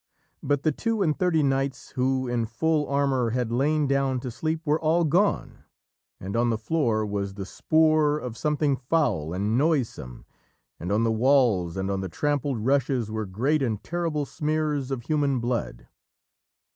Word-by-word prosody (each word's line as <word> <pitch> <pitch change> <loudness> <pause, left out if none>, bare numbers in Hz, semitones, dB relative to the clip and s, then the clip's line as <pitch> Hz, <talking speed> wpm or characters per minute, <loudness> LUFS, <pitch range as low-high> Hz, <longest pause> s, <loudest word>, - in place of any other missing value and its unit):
But 145 0 0
the 155 - +3
two 225 +5 -1
and 155 -4 +1
thirty 180 -5 +1
knights 135 -2 -1
who, 130 0 0
in 120 -2 -1
full 150 +6 0
armour, 140 -4 +1
had 120 0 -1
lain 145 +5 +1
down 135 -1 +1
to 125 - -5
sleep 155 +7 -2
were 150 +1 +1
all 165 +2 +2
gone, 180 +7 +1 0.6
and 95 +3 -5
on 120 +1 +2
the 115 - 0
floor 110 -3 0
was 100 -1 -3
the 100 -1 -5
spoor 155 - +2
of 125 -6 -6
something 150 +1 0
foul 130 - 0
and 105 +6 0
noisome, 135 - -1 0.5
and 90 +3 -4
on 105 +3 +2
the 115 - +2
walls 110 -8 +2
and 95 +1 -2
on 95 -1 -1
the 95 - -4
trampled 140 - -1
rushes 130 -4 +1
were 110 -1 -3
great 135 +11 0
and 110 -6 -2
terrible 165 -4 -2
smears 150 -3 -1
of 130 -3 -3
human 145 -2 +1
blood. 120 - -3
135 Hz, 170 wpm, -25 LUFS, 115-150 Hz, 0.6 s, the